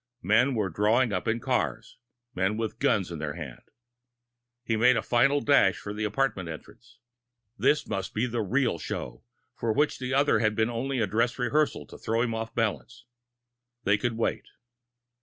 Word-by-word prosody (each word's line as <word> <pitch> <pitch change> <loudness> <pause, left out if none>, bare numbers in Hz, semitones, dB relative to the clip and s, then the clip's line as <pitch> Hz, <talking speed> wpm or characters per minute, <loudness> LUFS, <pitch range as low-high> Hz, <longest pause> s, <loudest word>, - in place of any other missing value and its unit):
Men 115 +8 +3
were 105 -5 -1
drawing 110 +5 +2
up 90 - -2
in 115 +1 +1
cars 120 -3 -2 0.3
men 95 +2 0
with 115 +1 -3
guns 105 -11 +1
in 85 - -5
their 75 -1 -4
hands. 75 -7 -9 1.0
He 115 -2 0
made 120 +3 +4
a - - -1
final 140 +4 +3
dash 140 -9 +4
for 100 - -6
the 105 +1 -2
apartment 105 -5 -1
entrance. 80 +6 -11 0.6
This 150 +4 +2
must 100 -3 -3
be 110 +3 +1
the 120 -2 -2
real 115 -3 0
show - - -6 0.3
for 115 - -1
which 145 +7 +1
the 130 0 -4
other 140 +2 +3
had 110 -1 +1
been 110 +2 +1
only 130 +3 -2
a 110 - +2
dress 115 +5 0
rehearsal 145 +5 0
to - - -13
throw 115 +1 0
him 115 -2 -1
off 115 0 -5
balance. 120 +2 -2 0.8
They 100 +1 +2
could 120 0 -1
wait. 115 - -1
115 Hz, 175 wpm, -27 LUFS, 105-125 Hz, 1.0 s, made